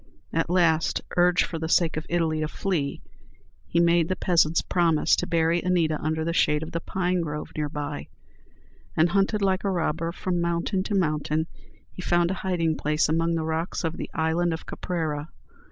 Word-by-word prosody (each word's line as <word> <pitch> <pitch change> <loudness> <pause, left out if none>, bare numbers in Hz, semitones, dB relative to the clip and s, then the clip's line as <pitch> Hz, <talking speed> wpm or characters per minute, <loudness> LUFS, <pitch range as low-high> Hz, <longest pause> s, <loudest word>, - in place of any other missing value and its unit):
At 165 0 0
last, 170 -3 +2 0.2
urged 180 0 +4
for 165 - -5
the 160 0 -3
sake 165 -1 +3
of 155 +1 -4
Italy 165 -2 +1
to 155 - 0
flee, 155 -4 -2 0.6
he 170 - +1
made 170 -1 +4
the 185 - +1
peasants 170 -3 +2
promise 165 -4 +3
to - - -1
bury 165 +1 +2
Anita 170 -4 +1
under 160 +1 -1
the 170 - -1
shade 150 -2 +2
of 160 - -7
the 170 - -2
pine 180 +1 -1
grove 150 -2 -5
near 150 -1 -1
by, 145 0 -5 0.9
and, 165 +2 +4
hunted 200 +2 +1
like 190 -1 +1
a 200 - +1
robber 165 -2 -1
from 175 0 -2
mountain 170 +3 0
to 205 - -1
mountain, 155 -3 0 0.5
he - - -8
found 175 0 +2
a 190 - -4
hiding 165 -4 0
place 150 +1 +1
among 165 +1 +1
the 160 - -1
rocks 160 +3 -2
of 165 +1 -2
the - - -5
Island 165 +2 +1
of 160 - -10
Caprera. 155 -3 -3
165 Hz, 185 wpm, -25 LUFS, 160-175 Hz, 0.9 s, urged